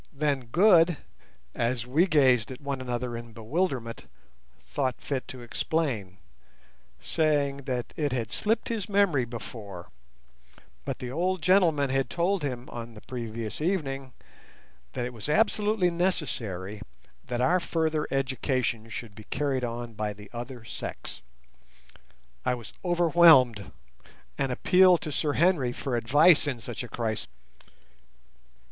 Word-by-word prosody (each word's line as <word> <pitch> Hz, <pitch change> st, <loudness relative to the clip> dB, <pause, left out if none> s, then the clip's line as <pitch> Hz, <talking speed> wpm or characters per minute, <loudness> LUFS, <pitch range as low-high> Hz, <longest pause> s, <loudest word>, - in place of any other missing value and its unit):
Then 140 Hz, -3 st, -1 dB
Good, 170 Hz, -, +5 dB, 0.6 s
as 120 Hz, 0 st, -1 dB
we 155 Hz, +9 st, +3 dB
gazed 130 Hz, -, +4 dB
at 130 Hz, -, -8 dB
one 140 Hz, -2 st, -4 dB
another 125 Hz, -1 st, -3 dB
in 115 Hz, -1 st, -8 dB
bewilderment, 120 Hz, 0 st, -2 dB, 0.6 s
thought 130 Hz, -3 st, -2 dB
fit 135 Hz, -3 st, -3 dB
to 125 Hz, -2 st, -9 dB
explain, 120 Hz, -, -2 dB, 0.8 s
saying 140 Hz, -, +1 dB
that 125 Hz, -3 st, -3 dB
it 145 Hz, -3 st, -1 dB
had 120 Hz, -3 st, -2 dB
slipped 220 Hz, +2 st, 0 dB
his 220 Hz, -5 st, -2 dB
memory 195 Hz, -11 st, +3 dB
before—but 65 Hz, -, -10 dB
the 125 Hz, -1 st, -6 dB
old 180 Hz, +4 st, -1 dB
gentlemen 165 Hz, -8 st, +4 dB
had 135 Hz, -2 st, 0 dB
told 175 Hz, -, 0 dB
him, 125 Hz, -3 st, -4 dB
on 115 Hz, -1 st, -7 dB
the 105 Hz, -, -11 dB
previous 115 Hz, -1 st, -5 dB
evening, 135 Hz, -7 st, -2 dB, 0.8 s
that 125 Hz, -2 st, -2 dB
it 125 Hz, -, -5 dB
was 115 Hz, +5 st, -7 dB
absolutely 210 Hz, 0 st, +2 dB
necessary 115 Hz, -, -2 dB, 0.5 s
that 120 Hz, -1 st, -2 dB
our 175 Hz, +9 st, +3 dB
further 160 Hz, -3 st, -1 dB
education 130 Hz, -3 st, -1 dB
should 110 Hz, -1 st, -7 dB
be 105 Hz, +1 st, -12 dB
carried 135 Hz, -2 st, -1 dB
on 120 Hz, 0 st, -4 dB
by 105 Hz, -1 st, -3 dB
the 105 Hz, 0 st, -14 dB
other 120 Hz, 0 st, -7 dB
sex. 65 Hz, -, -6 dB, 1.2 s
I 125 Hz, 0 st, +1 dB
was 120 Hz, -4 st, -10 dB
overwhelmed, 165 Hz, -, +5 dB, 0.6 s
and 135 Hz, -, -1 dB
appealed 180 Hz, +5 st, +5 dB
to 155 Hz, -, -4 dB
Sir 145 Hz, +1 st, 0 dB
Henry 160 Hz, -7 st, +3 dB
for 130 Hz, 0 st, -3 dB
advice 145 Hz, +8 st, +5 dB
in 130 Hz, -4 st, -2 dB
such 120 Hz, +1 st, -5 dB
a -, -, -7 dB
crisis. 110 Hz, -1 st, -2 dB
130 Hz, 130 wpm, -27 LUFS, 115-160 Hz, 1.2 s, Good